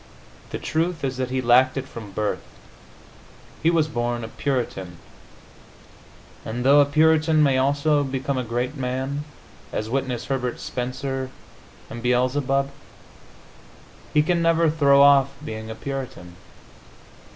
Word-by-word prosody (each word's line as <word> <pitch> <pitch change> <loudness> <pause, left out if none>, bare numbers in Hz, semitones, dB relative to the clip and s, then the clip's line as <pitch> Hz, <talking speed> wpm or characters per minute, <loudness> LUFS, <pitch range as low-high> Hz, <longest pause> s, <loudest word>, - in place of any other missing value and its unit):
The - - -4
truth 165 0 -2
is 130 -2 -2
that 130 -1 -2
he 130 0 -1
lacked 130 +2 +4
it 135 0 -3
from 115 -5 -9
birth; 105 +1 -2 1.2
he 165 - +3
was 165 -2 +2
born 120 -4 -2
a - - -4
Puritan 110 -10 -3 1.5
and 120 +3 -4
though 140 +2 +7
a - - +5
Puritan 155 +1 +4
may 135 -2 +3
also 145 +2 +2
become 135 0 -2
a 130 - -1
great 120 +4 -2
man 135 +2 -3 0.5
(as 110 +1 -3
witness 130 -3 -2
Herbert 125 -2 -2
Spencer 130 +1 -4 0.6
and 120 - -8
Beelzebub), 130 +3 +1 1.4
he 150 - +4
can 170 +2 +1
never 165 -1 +3
throw 140 -3 +5
off 140 -1 +5
being 110 -3 -6
a 110 - -5
Puritan. 125 -9 -6
135 Hz, 130 wpm, -23 LUFS, 125-145 Hz, 1.5 s, though